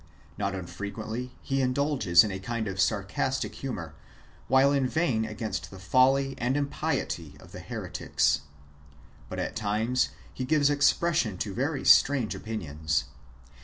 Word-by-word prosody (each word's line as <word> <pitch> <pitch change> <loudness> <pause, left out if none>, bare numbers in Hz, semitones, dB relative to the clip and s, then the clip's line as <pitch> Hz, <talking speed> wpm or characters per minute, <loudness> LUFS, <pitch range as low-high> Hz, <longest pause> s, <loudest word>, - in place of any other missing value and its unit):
Not 100 -1 -2
unfrequently 110 +6 -5
he 135 0 0
indulges 125 - +4
in 105 - -2
a 95 - -4
kind 115 +2 -3
of 95 -1 -1
sar 100 +1 +2
castic 130 +7 -2
humour, 90 - -5 0.5
while 135 +2 +5
inveighing 135 -4 +1
against 110 0 -4
the 95 - -11
folly 135 +7 +3
and 125 +3 +1
impiety 140 -1 -2
of - - -15
the - - -8
heretics. - - -1 0.9
But - - -6
at - - -3
tim.es 110 +4 0 0.2
he 130 - -4
gives 145 +1 +3
expression 145 - +2
to 100 +2 -3
very 135 +5 -2
strange 135 -6 +5
opinions. 80 -9 -2
120 Hz, 135 wpm, -28 LUFS, 100-135 Hz, 0.9 s, while